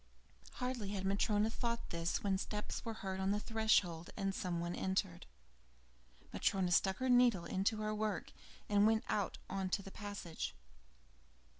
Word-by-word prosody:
Hardly 250 -5 -3
had 190 -1 -2
Matryona 205 +2 +2
thought 235 0 -2
this, 170 0 -1
when 195 -2 +1
steps 210 +1 -4
were 225 -2 -4
heard 190 0 -2
on 190 0 +1
the 205 +1 +2
threshold, 210 -7 +2
and 195 -2 0
some 180 -3 -2
one 170 +1 -2
entered. 190 - -1 1.1
Matryona 185 -2 +1
stuck 190 +2 +3
her 260 - -1
needle 245 -8 +5
into 195 +5 +1
her 215 0 0
work 215 -2 -2 0.4
and 205 0 +5
went 220 0 +3
out 205 -3 0
into 195 +1 -1
the 195 - -9
passage. 185 - -5
200 Hz, 150 wpm, -37 LUFS, 190-215 Hz, 1.1 s, needle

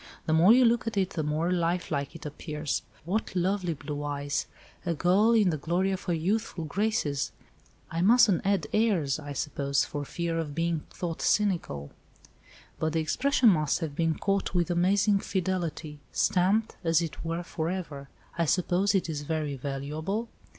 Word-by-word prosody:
The 160 - +1
more 170 +6 +6
you 250 +2 +7
look 235 0 +2
at 220 - -3
it 190 -1 +1
the 160 - -2
more 155 +3 0
life 175 0 0
like 140 +1 -2
it 165 - -10
appears. 150 -1 -3 0.2
What 200 +2 -2
lovely 180 -1 0
blue 145 0 -5
eyes! 145 0 -2 0.4
A 170 -2 -1
girl 190 +8 +4
in 210 -6 +4
the 155 - -3
glory 180 +6 0
of 190 - -4
her 175 - 0
youthful 185 +2 -1
graces; 170 -5 -1 0.6
I 165 0 -1
mustn't 215 -2 +5
add 195 -5 +1
airs, 185 - +2
I 145 -1 -6
suppose, 140 0 0
for 145 -1 -4
fear 165 +3 -2
of 150 -3 -4
being 165 -1 0
thought 170 -2 -5
cynical. 170 - 0 0.9
But 155 0 0
the 165 - +1
expression 250 - +3
must 155 -6 +2
have 160 -4 -4
been 165 0 +1
caught 195 -1 -1
with 175 0 +1
amazing 195 +4 +3
fidelity. 170 -6 -3
Stamped, 195 +5 +2
as 165 0 +3
it 165 - -6
were, 165 +1 -2
for 165 -2 -3
ever. 155 -7 -5 0.3
I 170 - +3
suppose 185 +4 +2
it 190 - +1
is 155 -3 -3
very 150 -1 -2
valuable?" 150 - -3
170 Hz, 170 wpm, -28 LUFS, 150-195 Hz, 0.9 s, you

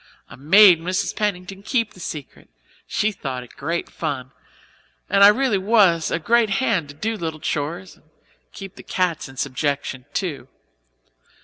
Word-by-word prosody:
I - - -9
made 175 +4 +6
Mrs. 185 +3 -2
Pennington 195 -2 -3
keep 230 +2 -1
the - - -16
secret 150 -5 -8 0.4
she 215 - 0
thought 130 -9 -5
it 125 - -17
great 165 +4 -3
fun; 135 -5 -5 0.8
and 200 0 +5
I - - +11
really 215 -1 +3
was 190 -5 +3
a - - 0
great 230 +6 +2
hand 195 - 0
to 145 - -11
do 220 +8 -2
little 160 -5 -5
chores 165 +6 -4
and - - -28 0.5
keep 195 -1 -10
the - - -9
cats 180 -7 -2
in 130 - -14
subjection 135 -1 -2
too. 145 -8 -3
175 Hz, 155 wpm, -22 LUFS, 145-200 Hz, 0.8 s, I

